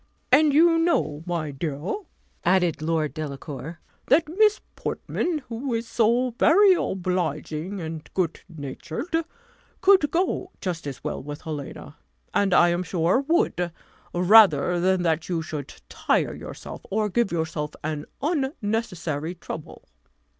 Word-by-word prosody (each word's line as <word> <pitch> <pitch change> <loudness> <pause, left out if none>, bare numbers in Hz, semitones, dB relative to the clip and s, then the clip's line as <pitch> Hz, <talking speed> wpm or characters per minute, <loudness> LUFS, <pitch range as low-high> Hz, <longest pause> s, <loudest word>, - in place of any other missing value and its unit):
"And 300 0 +6
you 330 +3 +5
know, 155 - +1
my 165 -4 -2
dear," 145 +4 -3 0.5
added 175 -4 +2
Lord 155 -1 0
Delacour, 150 0 -6 0.3
"that 300 +4 +4
Miss 420 +6 +3 0.2
Portman, 325 -5 -2
who 235 +1 -3
is 230 0 -3
so 240 +3 +2
very 390 +4 +6
obliging 180 - -2
and 160 -2 -6
good 175 -4 -1
natured, 160 - -5 0.6
could 380 -6 +5
go 360 +3 -1
just 170 -5 -4
as 135 - -7
well - - -3
with 145 +2 -7
Helena; 150 -3 -7 0.4
and 200 -1 +2
I 175 -1 +6
am 175 +1 0
sure, 180 +6 +1
would, 320 - +1 0.4
rather 180 -3 +6
than 185 0 +2
that 160 0 0
you 165 -2 -1
should 150 -3 -6 0.2
tire - - 0
yourself, - - -8
or 215 +1 +1
give 235 +1 +1
yourself 160 -2 -2
an 150 -1 -3 0.2
unnecessary 210 - -2
trouble." 160 -2 -9
175 Hz, 130 wpm, -25 LUFS, 155-245 Hz, 0.6 s, And